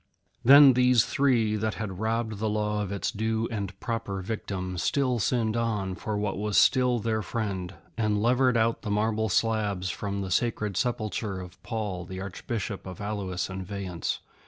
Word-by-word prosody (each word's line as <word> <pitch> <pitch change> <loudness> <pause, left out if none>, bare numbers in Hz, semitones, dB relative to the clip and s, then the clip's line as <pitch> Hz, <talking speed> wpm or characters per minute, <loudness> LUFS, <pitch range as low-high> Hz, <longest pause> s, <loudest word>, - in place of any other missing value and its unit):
Then 140 +1 +9
these 125 -2 +4
three, 120 -6 +2
that 110 +1 -1
had 95 -4 -5
robbed 110 -1 -1
the 110 0 0
Law 105 0 0
of 100 -2 -3
its 100 - -2
due 110 +1 -1
and 100 -3 -4
proper 115 -5 -3
victim, 95 -3 -4
still 130 - +1
sinned 110 0 +1
on 105 -5 -1
for 105 +2 -3
what 105 -2 -2
was 105 -1 0
still 125 -2 +4
their 110 -1 -1
friend, 95 -3 -3 0.2
and 105 -2 +1
levered 125 +2 +3
out 115 0 +1
the 110 - -5
marble 110 +1 +1
slabs 100 -3 0
from 100 +1 -3
the 95 -1 -4
sacred 105 -1 0
sepulchre 110 -4 -1
of 90 0 -10
Paul, 100 -6 -4
Archbishop 100 +1 -5
of 90 - -8
Alois 100 -3 -3
and 95 0 -5
Vayence. 95 -3 -4
105 Hz, 165 wpm, -27 LUFS, 95-115 Hz, 0.2 s, Then